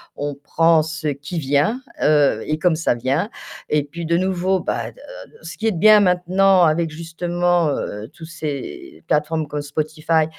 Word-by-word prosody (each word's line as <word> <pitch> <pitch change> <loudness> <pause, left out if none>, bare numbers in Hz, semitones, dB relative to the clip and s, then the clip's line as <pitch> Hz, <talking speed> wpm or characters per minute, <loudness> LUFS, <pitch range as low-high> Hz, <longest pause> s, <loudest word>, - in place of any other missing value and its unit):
on 145 0 -4
prend 160 +3 +2
ce 160 0 -5
qui 145 +4 -4
vient, 145 - +1 0.2
heu, 145 -7 +3
et 155 0 -2
comme 175 -1 +2
ça 160 -4 +1
vient 135 - -1 0.4
et 150 -1 +2
puis 170 +4 -7
de 170 +1 +1
nouveau 185 +1 0
bah, - - -3
heu, - - -17 0.5
ce - - -8
qui 220 - -1
est - - +3
bien 210 +4 +6
maintenant 185 0 +3
avec 165 0 +2
justement, 170 +1 0
heu, 110 -5 -4
tous 160 - -11
ces 170 - -7
plateformes 155 +1 0
comme 145 0 -4
Spotify, 155 +2 0
160 Hz, 170 wpm, -20 LUFS, 150-175 Hz, 0.5 s, bien